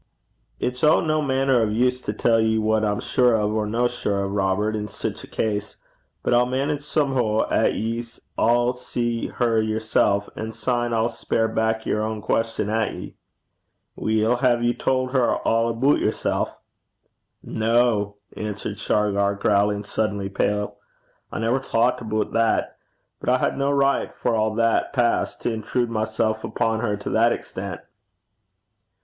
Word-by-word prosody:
'It's 125 0 -3
o' 155 +1 +6
no 155 -1 +1
mainner 135 -3 +2
o' - - +3
use 125 +4 +1
to - - -3
tell 115 +2 +2
ye 110 0 +2
what 110 0 +1
I'm 105 -1 0
sure 125 -3 +3
or 105 0 0
no 120 +3 +1
sure 105 -5 -2
o', - - -1
Robert, 100 +2 0
in 105 -1 -3
sic 100 - -5
a - - -10
case. 105 -1 -2 0.5
But - - +1
I'll 120 +1 +4
manage, 140 +3 -1
somehoo, 135 -7 +1
'at - - +2
ye 115 +2 -2
sall 120 +1 0
see 120 -2 -2
her 115 -2 +1
yersel', 110 -2 +1
an' 110 +1 -5
syne 120 -1 -1
I'll 115 0 +2
speir 115 -1 -1
back 110 0 -1
yer 105 - 0
ain 110 0 -3
queston 115 0 -1
at 110 0 0
ye.' - - -9 0.8
'Weel, 110 +2 +1
hae 120 -2 +3
ye 120 0 +2
tauld 130 0 0
her 130 -3 +2
a' 115 0 +2
aboot 120 +5 +2
yersel'?' - - 0 0.9
'No!' 110 -2 +1 0.2
answered 105 -1 -5
Shargar, 100 -1 +1
growing 100 0 +1
suddenly 105 -2 -2
pale. 105 +1 -1 0.5
'I - - -4
never 115 +4 +1
thocht 120 -2 +1
aboot 110 -1 -2
that. 115 0 +1 0.4
But - - -3
I 130 - +4
had - - 0
no 140 +1 0
richt, 140 -1 +1
for - - -1
a' 110 -1 +1
that 115 +3 +1
passed, 120 -3 0
to 120 - -1
intrude 115 +2 -1
mysel' 110 0 0
upo' 110 0 0
her 110 -2 -1
to 105 - -6
that 115 +1 +4
extent.' 95 -3 -5
115 Hz, 160 wpm, -23 LUFS, 105-120 Hz, 0.9 s, o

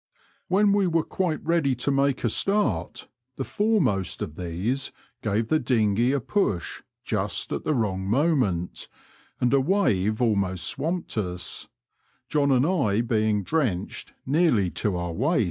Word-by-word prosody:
When 200 +2 +3
we 200 -2 +3
were 165 -2 +2
quite 170 -4 -2
ready 160 -5 +2
to 125 +3 -1
make 140 -1 +1
a 120 - +2
start 205 - 0 0.3
the 135 - -3
foremost 195 - 0
of 75 - -6
these 90 - -2 0.3
gave 110 +1 -1
the 155 - +3
dinghey 115 -1 +2
a 140 - +1
push 115 - -1 0.2
just - - -2
at - - -4
the 155 - +1
wrong 95 -5 -1
moment, 120 - +1 0.5
and 125 +1 +2
a 135 - +5
wave 110 - +1
almost 100 -7 +1
swamped 165 -3 -2
us, 90 -3 -3 0.6
John 145 -2 +2
and 130 0 +4
I 115 - +2
being 110 -3 +1
drenched 120 - -2
nearly 130 - +2
to 90 +4 -1
our 85 -1 -3
waists. 145 - +1
125 Hz, 145 wpm, -25 LUFS, 100-155 Hz, 0.6 s, a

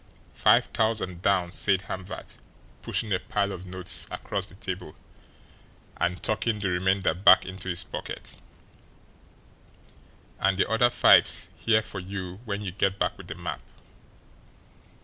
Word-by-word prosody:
"Five - - +4
thousand 110 -6 -1
down," 90 -3 +2
said 95 0 +1
Hamvert, 95 0 -7 0.4
pushing 110 -3 -1
a 90 - +1
pile 100 -1 -1
of 95 -1 -8
notes 90 0 -3
across 100 -1 -4
the 95 - -14
table, 95 -6 -6 1.0
and 90 +1 -2
tucking 110 +1 0
the 100 -2 -1
remainder 95 +2 +1
back 95 +3 +6
into 95 0 -6
his 85 0 0
pocket; 75 - -7 2.0
"and 95 -1 +2
the - - +2
other 115 +2 +3
five's 120 - +5
here 110 -1 +2
for 105 -2 -7
you 95 0 -6
when 100 -1 -3
you 95 - -4
get 95 +1 0
back - - 0
with - - -12
the - - -6
map. - - -5
95 Hz, 140 wpm, -27 LUFS, 90-105 Hz, 2.0 s, back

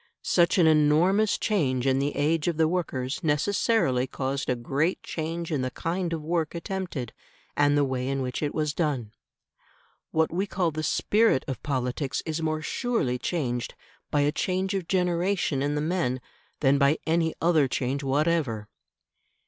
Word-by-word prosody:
Such 170 +1 +3
an 175 - +5
enormous 160 +7 +4
change 135 - 0
in 135 0 +3
the 145 +1 -1
age 150 +2 +1
of 170 -3 0
the 160 -1 +4
workers 150 -7 -2
necessarily 150 - +1
caused 135 +1 -3
a 125 - +2
great 140 +8 -1
change 165 +1 -4
in 145 -4 0
the 130 - -1
kind 170 +5 -3
of 160 -2 -3
work 165 0 -1
attempted 170 - -4 0.4
and 145 0 +3
the 145 - +4
way 130 -1 -2
in 135 0 -1
which 125 -1 -3
it 145 -1 -2
was 150 -2 0
done. 140 -11 -1 1.0
What 160 0 +1
we 190 +4 0
call 180 -4 0
the 155 +1 -4
"spirit" 205 +1 +2
of 130 -4 -4
politics 135 0 -2
is 160 0 -2
more 155 -1 -1
surely 155 - -1
changed 125 -9 -2 0.3
by 145 - +2
a 145 +1 +2
change 185 +4 -1
of 190 -4 -2
generation 180 -4 +1
in 145 +1 0
the 150 - 0
men 155 -6 0 0.4
than 140 -1 +4
by 140 +2 +4
any 165 0 +1
other 160 -4 +3
change 130 +2 -2
whatever. 140 -6 0
155 Hz, 165 wpm, -26 LUFS, 135-170 Hz, 1.0 s, an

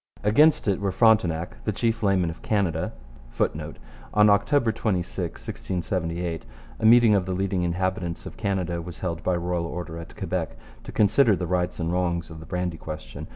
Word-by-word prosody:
Against 145 +10 +4
it 100 -2 +2
were 100 -1 0
Frontenac, 90 -6 +2
the 105 - 0
chief 115 +2 -1
laymen 95 -5 +2
of 80 - -12
Canada, 95 -7 0 0.4
[Footnote: - - -2 0.4
On 105 0 +6
October 120 +3 +3
26, 90 -5 -2
1678, 85 -2 -3 0.4
a - - -1
meeting 115 -1 +7
of 95 -3 +2
the 95 - -1
leading 95 -1 0
inhabitants 90 0 -2
of - - -8
Canada 95 -5 -1
was 85 0 -8
held 85 -2 -3
by 90 0 +1
royal 85 -1 -1
order 85 -1 -6
at 85 - -10
Quebec - - -3 0.3
to - - -7
consider 110 +2 +4
the 90 - -3
rights 90 +1 -1
and 85 0 -1
wrongs 85 -2 -1
of 80 - -9
the 80 - -11
brandy 90 -2 -2
question. 75 -8 -8
90 Hz, 175 wpm, -25 LUFS, 85-100 Hz, 0.4 s, meeting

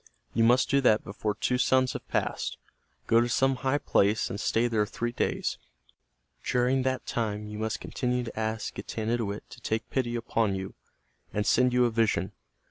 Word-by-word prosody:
You 115 - +3
must 120 +3 +5
do 140 +1 +3
that 110 -4 +4
before 105 +1 -3
two 125 +3 0
suns 130 0 +3
have - - -7
passed. - - -2 0.5
Go 115 +1 +4
to 120 - 0
some 135 +2 +2
high 135 +2 +1
place 105 -5 +2
and 100 - -4
stay 115 +2 +2
there 110 -3 +1
three 120 +3 -3
days. - - -1 0.8
During 125 +2 +2
that 130 0 -1
time 105 -3 -2
you 105 0 -7
must 110 0 -2
continue 125 -1 -1
to 115 -2 -6
ask 110 0 -2
Getanittowit 110 0 -2
to 125 - -12
take 110 -1 -2
pity 120 -3 0
upon 115 -3 0
you, 95 0 -5 0.6
and 105 0 -1
send 125 +1 +4
you 125 0 +4
a 120 - +1
vision. 110 -5 +1
115 Hz, 180 wpm, -28 LUFS, 105-125 Hz, 0.8 s, must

